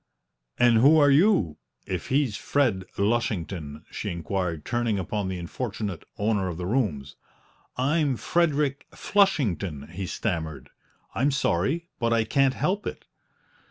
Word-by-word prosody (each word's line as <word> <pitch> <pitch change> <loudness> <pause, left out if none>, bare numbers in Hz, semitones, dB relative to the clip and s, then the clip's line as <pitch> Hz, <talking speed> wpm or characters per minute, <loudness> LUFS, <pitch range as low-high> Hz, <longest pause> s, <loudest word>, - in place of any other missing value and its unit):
"And 120 -2 +5
who 145 +7 +6
are 145 -2 +6
you, 140 - +3 0.3
if - - -4
he's 135 -5 +1
Fred 110 -6 0
Lushington?" 95 -8 -1
she - - -4
inquired, 85 -2 -3
turning 120 -3 0
upon 100 +2 -2
the 95 -1 -3
unfortunate 100 +1 -5
owner 105 -2 +1
of 85 -3 -4
the 90 - -4
rooms. 90 - -1 0.6
"I'm 140 0 +1
Frederick 150 -4 0
Flushington," 100 - +1
he 90 +2 -5
stammered; 80 -6 -3 0.4
"I'm 135 +4 +2
sorry 140 - 0
but 115 0 +1
I 115 -1 +3
can't 135 +3 +2
help 195 +3 -1
it!" - - -6
110 Hz, 130 wpm, -26 LUFS, 90-140 Hz, 0.6 s, who